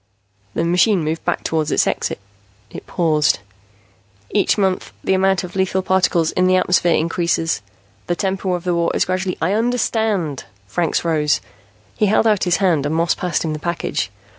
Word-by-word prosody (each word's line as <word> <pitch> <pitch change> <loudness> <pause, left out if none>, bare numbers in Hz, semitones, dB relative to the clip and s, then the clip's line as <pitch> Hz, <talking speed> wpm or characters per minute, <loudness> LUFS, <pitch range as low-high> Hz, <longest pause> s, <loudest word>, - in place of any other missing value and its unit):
The - - 0
machine 180 +2 +3
moved 160 +2 -2
back 175 - -1
toward 160 -1 -1
its - - +2
exit. - - -1 0.5
It - - -9
paused. 155 -4 +2 0.9
"Each 205 - +2
month 190 -2 0
the - - +1
amount 190 0 +2
of 180 0 -8
lethal 190 0 0
particles 180 -3 +2
in 180 0 +2
the 185 - +4
atmosphere 180 -2 +3
increases. 165 - 0 0.5
The 175 - 0
tempo 190 0 -1
of 175 - -5
the 180 -1 0
war 170 0 +1
is - - +2
gradually 185 0 -2
" - - -31
"I 180 +4 +2
understand." 220 - 0 0.2
Franks 165 - -1
rose. 150 -3 +2 0.6
He 210 - +2
held 215 +2 +3
out 210 -4 +2
his 180 -1 +2
hand 170 -8 +2
and 155 - -1
Moss 170 +1 +2
passed 175 -2 -2
him 155 - -1
the 155 - -5
package. 165 - -2
175 Hz, 180 wpm, -19 LUFS, 165-190 Hz, 0.9 s, the